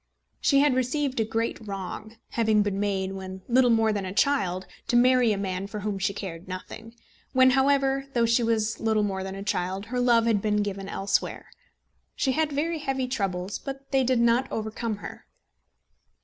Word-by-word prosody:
She 275 -1 +4
had 290 -2 +4
received 260 +1 0
a - - +3
great 225 +1 -2
wrong, 200 +3 -6
having 220 -2 +2
been 200 -1 -2
made, 195 -2 -1
when 190 -1 -7
little 250 0 +4
more 225 -1 +3
than 205 -1 -2
a 185 - -4
child, 195 -5 +1 0.2
to 255 - +1
marry 250 -1 +5
a 205 - 0
man 190 -1 -3
for 210 +1 -6
whom 205 -1 -2
she 195 - +1
cared 185 -3 -7
nothing; 220 +5 -8 0.4
when, 260 0 +6
however, 270 0 +2
though 235 -1 +4
she 230 +1 +3
was 225 -1 0
little 220 -1 +1
more 195 -2 -2
than 190 0 -5
a 195 - -6
child, 190 0 -2
her 250 - +1
love 240 -2 +4
had 220 -3 +2
been 210 0 +1
given 195 -1 -5
elsewhere. 195 0 -2 0.6
She 265 - +1
had 310 +2 0
very 315 +3 -1
heavy 270 -3 -2
troubles, 195 -6 -2
but 275 0 -8
they 270 -1 +3
did 255 -1 +2
not 235 +2 +2
overcome 220 +1 -3
her. - - -9
225 Hz, 190 wpm, -26 LUFS, 195-255 Hz, 0.6 s, when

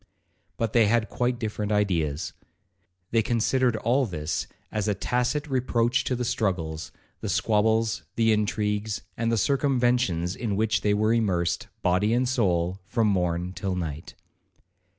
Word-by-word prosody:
But 115 -2 -1
they 115 -3 +5
had 110 0 +2
quite 125 0 0
different 105 -2 -3
ideas. 85 -7 0 0.8
They 115 - +4
considered 120 +2 +1
all 120 +4 +1
this 75 -5 -3 0.2
as 105 -1 -1
a 105 - +1
tacit 125 - 0
reproach 125 -2 +1
to 130 - 0
the 125 0 -2
struggles, 85 -9 -2 0.3
the - - -4
squabbles, 110 +1 +2
the 115 -1 +3
intrigues, 105 0 -1
and 115 0 0
the 115 - +2
circumventions, 120 - +1
in 110 -4 -2
which 110 +1 +1
they 105 0 +2
were 110 +2 +2
immersed, 90 -7 0 0.2
body 95 +5 +2
and 125 +1 +1
soul, 95 -7 +1
from 115 -1 +2
morn 90 -2 0
till 95 -1 -3
night. 80 -3 -5
110 Hz, 145 wpm, -26 LUFS, 95-120 Hz, 0.8 s, they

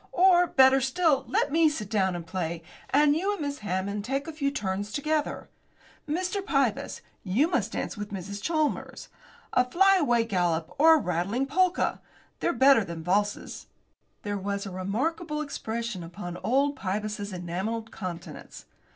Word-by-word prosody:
Or, 355 -1 +5
better 265 -1 +5
still, 280 +2 +2
let - - +1
me 320 +1 +5
sit 215 -9 -4
down 190 -3 +1
and 170 -1 -6
play, 170 -1 -4 0.3
and 290 +1 +4
you 385 +6 0
and 405 - -6
Miss 285 -1 -3
Hammond 200 +1 -2
take 275 +6 -2
a 325 - -5
few 285 -2 0
turns 205 -6 -3
together. 305 +2 -1 0.6
Mr. 365 +5 -1
Pybus, 275 - 0 0.2
you 215 - +2
must 355 - -1
dance - - -3
with 205 -1 -6
Mrs. 200 +1 -6
Chalmers. 310 0 -2 0.4
A 250 - +5
flyaway 300 -6 +3
gallop, 175 -6 0
or 320 +2 +8
a - - +3
rattling 195 - -1
polka. 365 +6 +1 0.4
They're 345 - +1
better 265 -3 +5
than 170 -3 -7
valses." 205 +4 -1 0.6
There 205 -1 -2
was 200 +1 -3
a 195 - -6
remarkable 295 - -2
expression 235 -8 -4
upon 175 +1 -7
old 275 +9 +1
Pybus's 205 +1 -3
enamelled 190 +6 -4
countenance. 175 -3 -8
230 Hz, 150 wpm, -27 LUFS, 195-300 Hz, 0.6 s, or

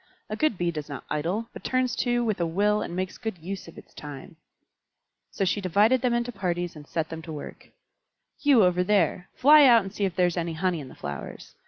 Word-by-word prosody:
A - - -1
good 305 -3 +1
Bee 175 -1 0
does 150 -2 -6
not 140 - -6
idle, 175 +10 -1
but - - -10
turns 255 -1 0
to 240 -1 +1
with 215 -5 -1
a - - +2
will 205 +5 +1
and 175 - -5
makes 185 0 -4
good 220 -5 -4
use 185 +4 -7
of 165 - -13
its - - -14
time." 145 +3 -9 0.9
So 195 - -2
she 205 +2 0
divided 210 +7 +3
them 245 -2 +1
into 240 +1 -1
parties 175 -5 -3
and 150 -1 -12
set 160 -1 -2
them 160 0 -6
to 160 - -9
work. 150 -2 -9 0.7
"You 275 -7 +5
over 180 0 +3
there, 185 -2 +1
fly 295 +2 +7
out 230 -3 +6
and 195 +1 -8
see 205 - -1
if 185 -3 -3
there 180 - +3
is 175 0 -1
any 170 -1 -2
honey 175 +1 -1
in 140 - -8
the - - -13
flowers. 70 -4 -7
185 Hz, 230 wpm, -26 LUFS, 165-220 Hz, 0.9 s, fly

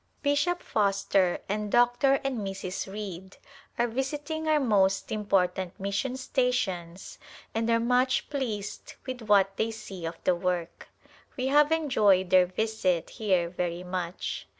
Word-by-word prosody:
Bishop 300 +5 +1
Foster 195 -3 +1
and 210 +1 -2
Dr. 245 +3 +4
and 270 -4 -2
Mrs. 195 -1 -4
Reid 190 -2 -7 0.4
are 240 - +2
visiting 290 +6 -3
our 310 -1 +4
most 195 -7 +2
important 190 -3 0
mission 200 +7 -2
stations 195 -10 -2 0.3
and 225 +1 -1
are 230 0 +4
much 250 +2 +2
pleased 225 -8 -4
with 255 -2 -5
what 200 -2 +3
they 220 - 0
see 195 -6 -7
of 165 0 -6
the 185 - +3
work. 175 -1 -3 0.5
We 255 - -1
have 295 +2 +5
enjoyed 210 - +3
their 185 -1 +6
visit 185 -3 -1
here 185 -6 +1
very 175 0 -3
much. 180 -1 -4
205 Hz, 135 wpm, -28 LUFS, 185-250 Hz, 0.5 s, their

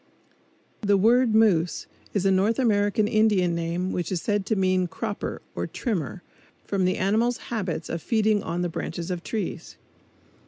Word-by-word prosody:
The 205 -2 +3
word 230 +3 +4
moose 185 -7 +3 0.3
is 200 -1 +1
a 195 - +4
North 195 +4 +2
American 210 -3 +2
Indian 210 -5 +3
name 170 +2 -2
which 175 - -3
is 185 - 0
said 205 +2 -1
to 220 - +1
mean 185 -2 +2
"cropper" 210 +3 -5
or - - -3
"trimmer," 185 - -3 0.4
from 195 -2 0
the 185 - +1
animal's 225 +5 +1 0.2
habits 180 -7 -2
of 165 - -4
feeding 215 -2 +2
on 175 -1 -2
the - - +1
branches 170 +2 -4
of 175 -1 -3
trees. 215 +3 -5
195 Hz, 160 wpm, -25 LUFS, 180-215 Hz, 0.4 s, word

